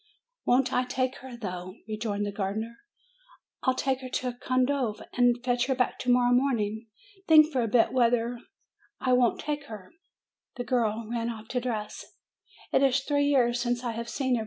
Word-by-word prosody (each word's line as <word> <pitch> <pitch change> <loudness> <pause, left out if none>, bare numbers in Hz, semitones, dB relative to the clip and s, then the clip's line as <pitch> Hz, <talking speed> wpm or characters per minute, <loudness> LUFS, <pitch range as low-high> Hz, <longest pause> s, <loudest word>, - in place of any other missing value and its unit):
"Won't 255 +1 +3
I 250 0 +2
take 255 0 -1
her, 255 -2 -10
though!" 185 -4 -6
rejoined 215 -1 -2
the 205 - -3
gardener. 210 +3 -3 0.9
"Fll 260 -1 +2
take 265 -1 0
her 255 - -7
to 250 0 -2
Condove, 255 -2 0
and 245 -1 +3
fetch 245 0 +1
her 265 - +1
back 250 -1 0
to 250 - +1
morrow 245 0 +4
morning. 230 -4 0 0.4
Think 310 -1 +7
for 260 -4 +1
a 230 - 0
bit 225 +1 +3
whether 240 -1 +2 0.6
I 255 - +1
won't 250 -2 +3
take 295 -1 -3
her 215 -7 -10 0.3
!" - - -62
The 245 - -2
girl 225 -2 0
ran 235 0 -2
off 220 -1 -8
to 250 - -1
dress. 220 -4 -4 0.7
"It - - +4
is 270 0 +3
three 285 +1 +1
years 245 -4 +3
since 240 0 -1
I 240 - -1
have 230 +1 -5
seen 260 -1 -1
her!" - - -1
245 Hz, 185 wpm, -28 LUFS, 225-255 Hz, 0.9 s, Think